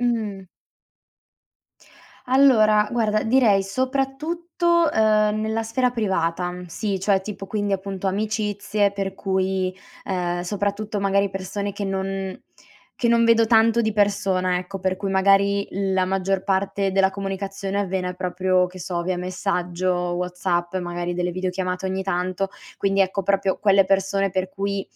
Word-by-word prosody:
Mh-mh. 215 Hz, -6 st, -2 dB, 1.8 s
Allora 220 Hz, -6 st, +5 dB
guarda 215 Hz, -3 st, +1 dB
direi 220 Hz, -5 st, +4 dB
soprattutto, 310 Hz, -, 0 dB
uhm, 215 Hz, -1 st, +3 dB
nella 220 Hz, +1 st, -1 dB
sfera 245 Hz, +3 st, 0 dB
privata, 180 Hz, -6 st, -1 dB
sì, 195 Hz, +3 st, -3 dB
cioè, 195 Hz, 0 st, +2 dB
tipo 195 Hz, 0 st, -7 dB
quindi 205 Hz, 0 st, -2 dB
appunto 195 Hz, 0 st, -3 dB
amicizie 210 Hz, 0 st, 0 dB
per 195 Hz, -1 st, -3 dB
cui, 190 Hz, -1 st, -1 dB, 0.3 s
uhm, 175 Hz, -2 st, -2 dB
soprattutto 205 Hz, +2 st, -2 dB
magari 200 Hz, 0 st, +2 dB
persone 200 Hz, +1 st, -4 dB
che 200 Hz, +1 st, -4 dB
non 195 Hz, 0 st, -3 dB, 0.6 s
che 240 Hz, -, +1 dB
non 230 Hz, 0 st, +4 dB
vedo 230 Hz, -1 st, +5 dB
tanto 225 Hz, 0 st, +4 dB
di 220 Hz, -1 st, 0 dB
persona, 195 Hz, -3 st, +1 dB
ecco 185 Hz, +1 st, -7 dB
per 185 Hz, 0 st, 0 dB
cui 195 Hz, 0 st, -3 dB
magari 200 Hz, +1 st, +3 dB
la 190 Hz, -1 st, 0 dB
maggior 190 Hz, 0 st, -1 dB
parte 195 Hz, 0 st, 0 dB
della 190 Hz, 0 st, +3 dB
comunicazione 195 Hz, 0 st, -4 dB
avviene 185 Hz, -2 st, -1 dB
proprio 185 Hz, 0 st, +1 dB
che 180 Hz, 0 st, -11 dB
so 175 Hz, 0 st, -3 dB
via 185 Hz, +1 st, -1 dB
messaggio 180 Hz, 0 st, -1 dB, 0.2 s
WhatsApp 180 Hz, 0 st, -2 dB
e 185 Hz, -, 0 dB
magari 175 Hz, 0 st, -3 dB
delle 180 Hz, 0 st, -1 dB
videochiamate 185 Hz, 0 st, -3 dB
ogni 190 Hz, 0 st, -2 dB
tanto 185 Hz, +1 st, -1 dB, 0.3 s
quindi, 195 Hz, 0 st, +1 dB
ecco, 195 Hz, +1 st, +1 dB
proprio 195 Hz, 0 st, +1 dB
quelle 195 Hz, -2 st, +5 dB
persone 195 Hz, 0 st, +1 dB
per 185 Hz, 0 st, -1 dB
cui 200 Hz, +1 st, -2 dB
195 Hz, 140 wpm, -23 LUFS, 185-210 Hz, 1.8 s, Allora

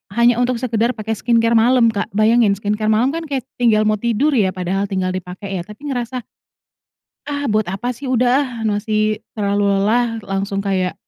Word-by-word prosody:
hanya 235 Hz, 0 st, +4 dB
untuk 245 Hz, 0 st, +1 dB
sekedar 235 Hz, 0 st, 0 dB
pakai 220 Hz, 0 st, -5 dB
skincare 230 Hz, -1 st, +2 dB
malam, 235 Hz, 0 st, +4 dB
Kak. 205 Hz, -2 st, -2 dB
Bayangin, 215 Hz, -1 st, +4 dB
skincare 210 Hz, +2 st, -2 dB
malam 220 Hz, +5 st, +3 dB
kan 330 Hz, +1 st, -4 dB
kayak 275 Hz, -4 st, -2 dB, 0.2 s
tinggal 220 Hz, -3 st, +4 dB
mau 215 Hz, -1 st, +1 dB
tidur 235 Hz, +6 st, +1 dB
ya, 200 Hz, -8 st, +2 dB
padahal 190 Hz, +2 st, -1 dB
tinggal 185 Hz, -1 st, -1 dB
dipakai 185 Hz, +1 st, -5 dB
ya, 170 Hz, -, -4 dB
tapi 275 Hz, +8 st, -7 dB
ngerasa 245 Hz, 0 st, -3 dB, 1.0 s
"Ah, 285 Hz, -3 st, -2 dB
buat 215 Hz, 0 st, +1 dB
apa 195 Hz, +7 st, -3 dB
sih? 250 Hz, +3 st, -6 dB
Udah 250 Hz, 0 st, +1 dB
ah, -, -, -3 dB
masih 215 Hz, 0 st, 0 dB, 0.2 s
terlalu 205 Hz, -1 st, 0 dB
lelah." 220 Hz, +4 st, +1 dB
Langsung 195 Hz, 0 st, -2 dB
kayak 190 Hz, -2 st, -1 dB
220 Hz, 180 wpm, -19 LUFS, 200-245 Hz, 1.0 s, hanya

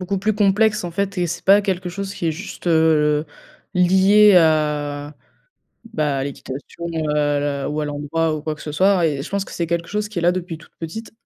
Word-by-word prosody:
beaucoup 190 Hz, +2 st, -2 dB
plus 215 Hz, +3 st, 0 dB
complexe, 210 Hz, +1 st, +2 dB
en 175 Hz, -, -4 dB
fait 195 Hz, +2 st, -2 dB
et 175 Hz, -, +1 dB
c'est 165 Hz, -, -5 dB
pas 200 Hz, +2 st, +6 dB
quelque 185 Hz, -3 st, -2 dB
chose 195 Hz, +2 st, -5 dB
qui 170 Hz, -, -3 dB
est 160 Hz, -, +1 dB
juste 180 Hz, +3 st, -9 dB, 1.1 s
lié 190 Hz, +3 st, +5 dB
à, 150 Hz, -3 st, +1 dB, 0.8 s
bah, 150 Hz, -3 st, 0 dB
à 135 Hz, -, -1 dB
l'équitation, 140 Hz, +4 st, -7 dB
heu, 160 Hz, -1 st, -2 dB
l 145 Hz, -1 st, 0 dB
ou 150 Hz, +1 st, -2 dB
à 150 Hz, -, -2 dB
l'endroit 150 Hz, +2 st, -1 dB
ou 150 Hz, -, -6 dB
quoi 155 Hz, 0 st, -3 dB
que 150 Hz, -, -14 dB
ce 150 Hz, -, -6 dB
soit. 185 Hz, +2 st, +3 dB
Et 145 Hz, -4 st, -1 dB
je -, -, -8 dB
pense 200 Hz, -1 st, -2 dB
que -, -, -12 dB
c'est 170 Hz, -1 st, -3 dB
quelque 170 Hz, 0 st, -2 dB
chose 210 Hz, 0 st, -2 dB
qui 210 Hz, -, -9 dB
est -, -, -4 dB
là 175 Hz, +1 st, +4 dB
depuis 175 Hz, -2 st, -5 dB
toute 165 Hz, -, -19 dB
petite. 215 Hz, +8 st, -7 dB
170 Hz, 220 wpm, -20 LUFS, 150-195 Hz, 1.1 s, pas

